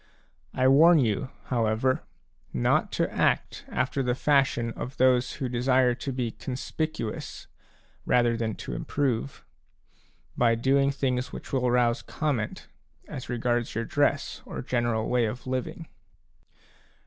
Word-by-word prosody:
I 130 0 +3
warn 160 +6 +7
you, 120 -3 +1
however, 120 +1 +1 0.5
not 60 - +1
to - - 0
act - - 0
after 130 +2 -1
the 125 -2 0
fashion 135 -5 +2
of 125 +3 -7
those 130 -1 +3
who 135 -3 -3
desire 125 +1 +2
to 130 +3 -5
be 125 -3 -2
conspicuous 130 -1 -4 0.6
rather 120 -1 +3
than 115 -2 -2
to - - -4
improve, 135 - -2 0.9
by 115 -1 +3
doing 135 +4 +3
things 130 -2 -1
which - - -9
will 125 -2 +2
rouse 120 0 +2
comment 140 -9 -3 0.4
as 130 - -7
regards 120 -1 -1
your 115 +1 -1
dress 145 +2 0
or - - -6
general 120 -3 0
way 125 -2 +2
of 120 +3 -5
living. 130 +5 -3
125 Hz, 130 wpm, -27 LUFS, 120-135 Hz, 0.9 s, warn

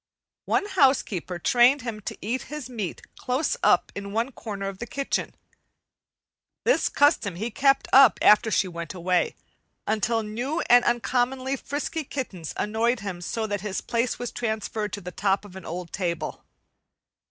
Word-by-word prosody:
One - - +1
housekeeper 265 - +1
trained 245 +8 +4
him 230 -3 -4
to - - -10
eat 240 +6 -1
his 300 -3 -6
meat 220 -8 -5
close 265 - 0
up - - +3
in 200 0 -6
one 230 +4 0
corner 200 -5 -5
of 195 -1 -6
the 240 - -5
kitchen. 275 +4 -2 1.3
This - - +3
custom 285 - +3
he 220 +7 -3
kept 275 +4 +3
up 265 -6 +8
after 210 +1 +6
she 195 -2 +2
went 170 -1 -6
away, 180 0 +1 0.5
until 220 +2 0
new 245 +10 -2
and 245 0 +5
uncommonly 255 +2 0
frisky 295 +4 -3
kittens 210 - -5
annoyed 225 +2 0
him 185 -3 -5
so 220 +5 -2
that 205 -2 -3
his 205 -2 -3
place 235 +1 -1
was 245 -1 -4
transferred 220 -2 -3
to 205 - -4
the 180 0 -7
top 195 +2 0
of 195 -2 -13
an 190 - -9
old 175 0 -6
table. 170 -4 -3
225 Hz, 160 wpm, -25 LUFS, 195-255 Hz, 1.3 s, up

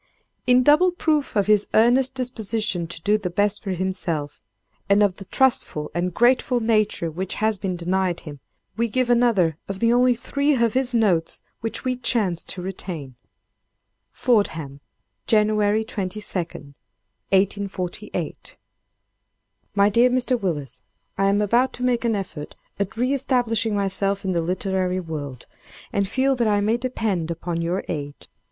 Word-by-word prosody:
In 250 0 +5
double 300 +7 +5
proof 310 -7 0
of 200 -2 +3
his 210 -1 +3
earnest 250 +4 +4
disposition 220 -7 -2
to 170 - -6
do 210 +3 +3
the 190 -3 -3
best 205 +3 0
for 200 - -6
himself, 180 -5 -3 0.5
and 200 +1 +5
of 195 -3 +1
the 195 - -9
trustful 235 - +1
and 180 +1 -1
grateful 245 +4 +3
nature 215 -7 +1
which 185 +4 -4
has 215 -2 0
been 185 -1 -2
denied 180 0 -1
him, 145 -2 -9 0.4
we 235 +1 +1
give 250 +2 0
another 205 -10 +3
of 195 -1 -5
the 230 +2 +3
only 250 0 +4
three 280 +5 0
of 235 -3 +2
his 260 -1 0
notes 185 -8 +1 0.2
which 225 +2 -4
we 255 0 +1
chance 220 -8 0
to 180 - -5
retain: 175 -7 -6 1.0
"FORDHAM, 160 - 0 0.5
January 215 0 +3
22, 200 -2 -4
1848. 185 +3 -4 1.2
"MY 200 0 +5
DEAR 235 +4 +4
MR. 250 -1 +1
WILLIS—I 145 +2 -4
am 200 +1 +3
about 240 +5 +2
to 250 - -5
make 245 -1 +1
an 230 -2 +1
effort 180 -7 -6 0.2
at 200 +2 -3
re 250 +3 +1
establishing 230 -5 +1
myself 195 0 0
in 190 - 0
the 170 -2 +1
literary 185 +1 -1
world, 145 -7 -6 0.5
and 200 -1 +1
feel 265 +5 +1
that 235 -2 +2
I 205 -1 +3
may 215 +3 +1
depend 220 -9 -2
upon 170 0 -3
your 175 +3 -1
aid. 145 -3 -4
205 Hz, 150 wpm, -23 LUFS, 180-235 Hz, 1.2 s, In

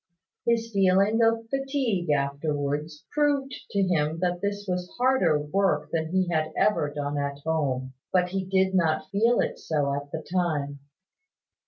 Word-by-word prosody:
His 230 -1 +1
feeling 195 +3 +3
of 225 0 +2
fatigue 270 - -1
afterwards 145 +1 -1
proved 285 -3 +1 0.2
to 200 -2 +1
him 160 -4 +1
that 180 0 -1
this 205 0 -2
was 180 -1 -2
harder 245 - +3
work 190 +6 0
than 160 -1 -1
he 185 0 +2
had 155 -2 0
ever 205 -8 +2
done 145 0 -3
at 140 0 -2
home; 135 -5 -1 0.2
but 180 -1 +2
he 190 +1 -2
did 190 0 +1
not 160 -3 +1
feel 230 +4 +3
it - - -3
so 145 -3 0
at 145 0 -5
the 160 - -4
time. 150 -6 -1
180 Hz, 155 wpm, -26 LUFS, 150-200 Hz, 0.2 s, feeling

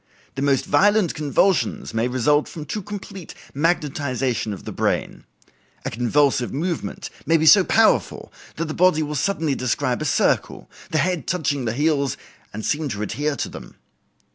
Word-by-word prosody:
The 135 - -5
most 140 -2 +2
violent 205 -3 +3
convulsions 150 - 0
may 115 +2 +1
result 130 +4 +2
from 155 -2 -8
too 210 +8 -4
complete 195 -2 -8 0.2
magnetization 140 - -1
of 100 - -8
the - - -5
brain. - - -2 0.6
A - - -2
convulsive 125 +2 +1
movement 170 +5 -4 0.2
may 165 - +4
be 160 - 0
so 195 +4 +8
powerful 220 +4 +2 0.2
that 165 - -2
the 155 - -4
body 175 -3 +3
will 150 0 -4
suddenly 155 0 0
describe 125 0 -1
a - - -2
circle, - - 0 0.2
the 155 - 0
head 175 -3 0
touching 145 -7 -1
the 110 - -1
heels 140 -1 0 0.3
and 110 +1 -6
seem 150 0 -1
to 105 -3 -3
adhere 145 +7 -2
to - - -3
them. - - -11
150 Hz, 165 wpm, -22 LUFS, 130-165 Hz, 0.6 s, so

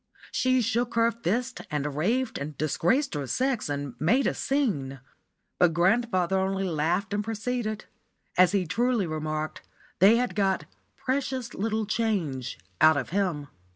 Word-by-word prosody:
She 255 0 +2
shook 235 +2 0
her 230 0 +4
fist 235 +4 -2
and 150 -2 -2
raved 225 - 0
and 145 0 -6
disgraced 175 - +1
her 145 -3 -3
sex 250 - 0
and 140 -2 -3
made 235 - +3
a - - +2
scene; 180 - -1 0.6
but 170 -3 +4
grandfather 190 0 +2
only 190 0 0
laughed 175 +5 0
and 205 0 0
proceeded. 220 0 -3 0.5
As 180 0 +5
he 195 -3 +1
truly 230 +4 +1
remarked, 155 -1 -3 0.4
they 200 +6 +7
had 245 -4 0
got 195 -1 +1 0.3
"precious 260 -2 -2
little 220 +1 -1
change" 180 - -1 0.2
out 155 -1 +7
of 145 - -2
him. 175 -7 -1
195 Hz, 145 wpm, -27 LUFS, 155-235 Hz, 0.6 s, they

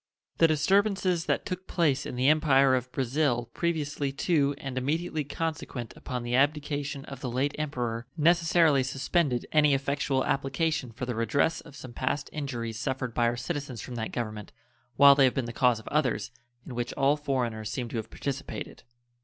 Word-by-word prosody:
The 165 - +7
disturbances 185 +2 +2
that - - 0
took 185 -1 -5
place 160 -7 +1
in - - -5
the 125 +2 +1
Empire 140 -3 +5
of 125 0 -1
Brazil 125 -2 0
previously 150 -4 -1
to 145 -1 +1
and 135 -2 -6
immediately 155 +4 -1
consequent 145 -5 -4
upon 125 -3 -5
the 120 0 -3
abdication 145 0 0
of 140 - -9
the 130 - -3
late 135 +4 0
Emperor 120 -6 -3
necessarily 165 -2 +4
suspended 135 0 0
any 150 -2 +5
effectual 135 -1 0
application 135 -1 -1
for 120 +3 -5
the 125 - -2
redress 140 +8 +1
of 150 - -14
some 130 -4 -10
past 130 +4 -2
injuries 120 -7 -4
suffered 130 -3 -2
by 120 0 +2
our 120 +1 -1
citizens 140 -4 -4
from 125 - -7
that 110 -2 -4
Government, 110 -3 -5 0.4
while 140 +2 +9
they 140 -1 +5
have 130 - +1
been 130 - 0
the 120 - -6
cause 125 -1 +3
of 110 - -15
others, 130 -8 0 0.3
in 130 - -8
which 120 0 -3
all 140 +2 +3
foreigners 125 -7 -2
seem 125 -2 -3
to 115 - -4
have 110 0 -4
participated. 140 0 -5
135 Hz, 180 wpm, -28 LUFS, 125-150 Hz, 0.4 s, while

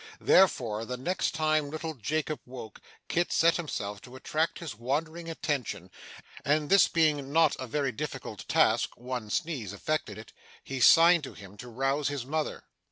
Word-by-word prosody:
Therefore, 120 - +3
the 125 +2 -5
next 175 +8 -1
time 155 -2 +1
little 160 +1 -4
Jacob 155 +4 -2
woke, 125 -5 -9 0.3
Kit 175 +1 0
set 165 +1 +4
himself 105 - -4
to 125 0 -13
attract 155 +5 -1
his 165 -8 -6
wandering 160 +9 -3
attention, 135 - -3 0.5
and 150 +2 +1
this 195 -1 +7
not - - -15
being 150 -3 +2 0.2
a 130 - -5
very 140 +2 -1
difficult 110 - -6
task - - +2
(one 125 -3 -5
sneeze 130 - -2
effected 105 -1 -2
it), 110 +1 -12 0.3
he 135 -1 -5
signed 165 +6 +7
to - - -9
him 100 0 -12
to 125 +3 -9
rouse 135 +4 0
his 145 -4 -3
mother. 155 +2 -3
145 Hz, 165 wpm, -29 LUFS, 120-160 Hz, 0.5 s, this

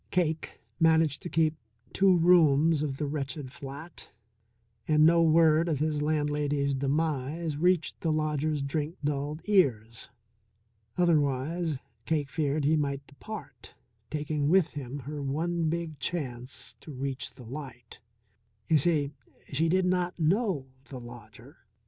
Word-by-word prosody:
Cake 160 -3 -1 0.2
managed 160 -3 +3
to 175 - -6
keep 160 -2 +2 0.4
two 190 -2 +5
rooms 165 -3 +5
of 140 -3 -2
the 150 - -2
wretched 145 -1 -4
flat, 140 +5 -9 0.8
and 155 0 +5
no 170 +1 +5
word 160 0 +4
of 155 - +1
his 150 0 0
landlady's 145 -2 0
demise 145 +2 -1
reached 175 +2 +1
the 165 - +1
lodger's 155 -1 0
drink 150 +3 -2
dulled 145 +2 -2
ears. 115 - +1 0.9
Otherwise 155 -1 +1 0.3
Cake 150 -4 0
feared 150 -2 0
he 155 +2 +4
might 140 -2 -1
depart, 145 +1 -10 0.3
taking 150 -1 -1
with 180 -2 +4
him 140 -2 -6
her 145 +2 -6
one 160 +4 -1
big 165 -3 -3
chance 130 -6 -4
to 155 - -11
reach 135 -1 -4
the 125 - -12
light. 120 -2 -9 0.7
You 155 - +5
see, 145 -2 +1 0.4
she 160 +4 +2
did 185 +2 +2
not 180 -1 0
know 175 - +1 0.2
the 130 - -8
lodger. 120 +2 -13
150 Hz, 130 wpm, -29 LUFS, 140-165 Hz, 0.9 s, two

